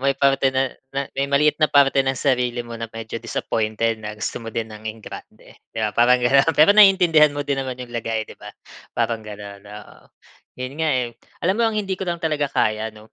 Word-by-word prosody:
May 135 0 +1
parte 135 -1 +3
na 130 0 0 0.2
na 140 - 0
may 140 +1 -2
maliit 150 +2 +2
na 155 - +4
parte 140 -1 +4
ng 135 -1 0
sarili 125 -3 0
mo 120 - -10
na 115 - -4
medyo 115 0 -7
disappointed, 110 -1 -2
na 105 0 -7
gusto 110 - -4
mo 115 - -8
din 110 -1 -4
ng 105 +1 -7
engrande. 110 0 -11
'Di - - -9
ba? 105 - -1
Parang 125 +1 +5
gano'n. 135 +5 +4
Pero 155 +7 +7
naiintindihan 180 -8 +6
mo 145 0 -3
din 140 -1 -1
naman 130 -1 -5
'yong 125 -1 -9
lagay, 115 -1 -2
'di - - -14
ba? 105 - -9 0.5
Parang 115 -1 0
gano'n, 105 -1 -10
oo. 105 0 -12 0.6
'Yon 130 +1 -5
nga 160 - +1
eh. 125 -4 0 0.3
Alam 190 +2 +2
mo - - +4
ang 215 - -4
hindi 195 -2 -1
ko 190 - -3
lang 170 - -1
talaga 150 -3 0
kaya, 110 +1 0
'no? 110 0 -16
125 Hz, 220 wpm, -21 LUFS, 110-145 Hz, 0.6 s, Pero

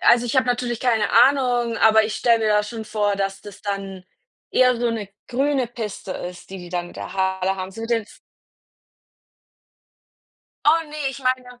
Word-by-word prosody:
also, 240 0 +5
ich 240 - -1
habe 260 -1 +3
natürlich 245 -1 -1
keine 235 -4 +1
Ahnung, 245 -2 +3
aber 220 0 +5
ich 215 0 -3
stelle 235 -2 +3
mir 220 - 0
da 210 0 +3
schon 220 +1 -6
vor, 210 -2 0
dass 195 0 -2
das 205 -1 -12
dann 195 -2 -5 0.5
eher 250 -1 +4
so 240 0 +1
'ne 220 -3 -4 0.2
grüne 270 +1 0
Piste 220 -5 -6
ist, 180 +1 -8
die 195 - -7
die 175 -1 -9
dann 175 0 -4
da - - -7
in - - -8
der - - -8
Halle 190 0 0
haben, 185 0 -5
so 225 - -9
mit 225 +1 -5
den 230 -1 +2
F - - -18 2.5
Oh 325 +2 +4
ne, 300 - -11 0.2
ich 265 - -9
meine 255 -2 -2
225 Hz, 195 wpm, -22 LUFS, 195-245 Hz, 2.5 s, also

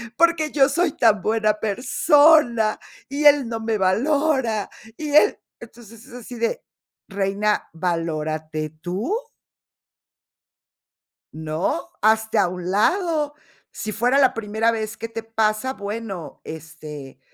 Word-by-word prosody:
porque 335 -1 +2
yo 275 -2 +4
soy 340 +2 +1
tan 215 -6 +3
buena 215 -1 +2
persona, 245 - +3 0.3
y 285 +2 -2
él 285 -4 +6
no 225 -1 -3
me 225 -1 -1
valora, 250 +2 +1 0.3
y 305 -1 -5
él", 415 +8 +5 0.2
entonces, 230 0 -14
es 265 - -16
así 245 0 -9
de, 235 - -2 0.5
reina, 200 +1 -1
valórate, 155 -2 -3
tú. 205 - -2 2.2
No, 160 - -3
hazte 220 0 +2
a - - +4
un 180 0 -5
lado. 300 - +1 0.4
Si 215 - -5
fuera 245 +6 +2
la 260 -2 +4
primera 220 +1 0
vez 220 -1 -4
que 230 +1 -6
te 225 0 -6
pasa, 225 +3 0
bueno, 200 - -6
este, 150 -4 -9
225 Hz, 120 wpm, -22 LUFS, 195-270 Hz, 2.2 s, él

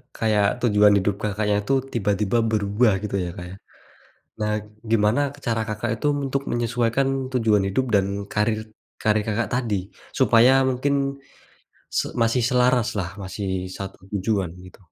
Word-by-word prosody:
kayak 105 -2 +2 0.2
tujuan 105 -2 +5
hidup 100 0 +1
Kakaknya 105 0 0
tuh 135 0 +3 0.2
tiba-tiba 105 0 0
berubah 105 +1 +2
gitu 100 -1 -3
ya, 90 -1 -2
Kak, 90 - -7
ya. - - -9 0.9
Nah 105 0 0 0.4
gimana 110 +4 +3 0.3
cara 115 -1 +1
Kakak 110 +2 -2
itu 130 - -4 0.2
untuk 140 +1 -1
menyesuaikan 120 +2 0 0.3
tujuan 110 -5 +3
hidup 130 +7 +1
dan 95 -1 +3 0.3
karir 110 +1 +1 0.4
karir 105 -1 +2
Kakak 110 0 0
tadi 120 -4 0 0.4
supaya 125 -1 +6 0.2
mungkin 130 +3 0 0.9
se - - -1 0.2
masih 115 +1 +2
selaraslah, 125 -7 +2
masih 95 -1 -4
satu 95 0 -7
tujuan 100 -3 -1
gitu? 90 0 -14
105 Hz, 135 wpm, -23 LUFS, 100-120 Hz, 0.9 s, supaya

